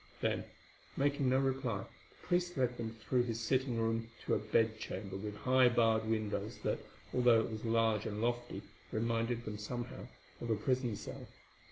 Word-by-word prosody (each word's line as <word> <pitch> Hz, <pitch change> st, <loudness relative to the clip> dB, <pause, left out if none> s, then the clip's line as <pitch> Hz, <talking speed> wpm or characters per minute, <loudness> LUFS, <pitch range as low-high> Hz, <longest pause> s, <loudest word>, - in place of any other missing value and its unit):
Then, -, -, 0 dB, 0.5 s
making 140 Hz, -1 st, +2 dB
no 130 Hz, -, +4 dB
reply, 130 Hz, -6 st, 0 dB
the -, -, -19 dB
priest 175 Hz, -1 st, +1 dB
led 125 Hz, -2 st, +2 dB
them 115 Hz, -2 st, -4 dB
through 125 Hz, +2 st, +2 dB
his 115 Hz, -2 st, -2 dB
sitting 125 Hz, +1 st, +1 dB
room 115 Hz, 0 st, 0 dB, 0.2 s
to -, -, +1 dB
a -, -, +3 dB
bed 110 Hz, +1 st, +2 dB
chamber 95 Hz, -2 st, -5 dB
with 105 Hz, +2 st, -4 dB
high 130 Hz, +3 st, +5 dB
barred 115 Hz, -2 st, +3 dB
windows, 110 Hz, -2 st, -1 dB
that, -, -, 0 dB, 0.3 s
although 120 Hz, -2 st, +6 dB
it 115 Hz, -, -3 dB
was 110 Hz, +1 st, -5 dB
large 115 Hz, -1 st, +2 dB
and 105 Hz, -1 st, -3 dB
lofty, 120 Hz, +1 st, -1 dB, 0.3 s
reminded 115 Hz, +1 st, 0 dB
them 105 Hz, -1 st, -4 dB
somehow 120 Hz, +3 st, -5 dB, 0.3 s
of 120 Hz, -, -4 dB
a 110 Hz, -, +4 dB
prison 125 Hz, +1 st, 0 dB
cell. -, -, -7 dB
115 Hz, 175 wpm, -35 LUFS, 110-125 Hz, 0.5 s, although